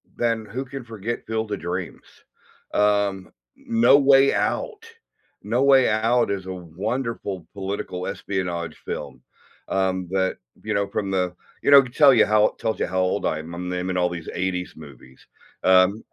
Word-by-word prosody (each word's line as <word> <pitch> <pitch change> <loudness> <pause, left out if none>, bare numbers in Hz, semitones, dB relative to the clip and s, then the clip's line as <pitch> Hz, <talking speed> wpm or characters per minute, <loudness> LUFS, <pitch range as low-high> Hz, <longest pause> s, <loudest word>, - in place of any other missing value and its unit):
then 115 -2 -1
who 130 +6 -5
can 135 0 -8
forget 115 0 -5
Field 110 -1 -3
of 100 - -2
Dreams? 90 0 -5 0.7
Um, 100 -2 +1 0.2
No 235 - +4
Way 140 -1 +5
Out. 450 -2 -2 0.6
No 120 +5 0
Way 135 -3 +5
Out 115 +2 +2
is 95 -2 -3
a 95 - -4
wonderful 95 +2 -4
political 95 -2 -4
espionage 90 -4 -4
film, - - -6 0.5
um, 95 -1 0
that, 95 -1 0 0.3
you 105 0 -2
know, 100 -1 0
from 100 -2 -3
the 90 -2 -1 0.3
you - - +3
know, 140 - +11
it - - +4
could 125 -1 -11
tell 145 -3 +7
you 115 - +5
how 105 0 +4
it - - -9
tells 110 - -2
you - - +1
how 95 +1 -2
old 95 +2 0
I 80 - 0
am, 80 +2 -9
I'm 90 +1 -5
naming 90 +1 -2
all 90 0 +2
these 85 -2 -7
80s 90 -1 -3
movies. 65 -4 -15 0.4
Um 95 +3 +4
100 Hz, 175 wpm, -23 LUFS, 90-120 Hz, 0.7 s, know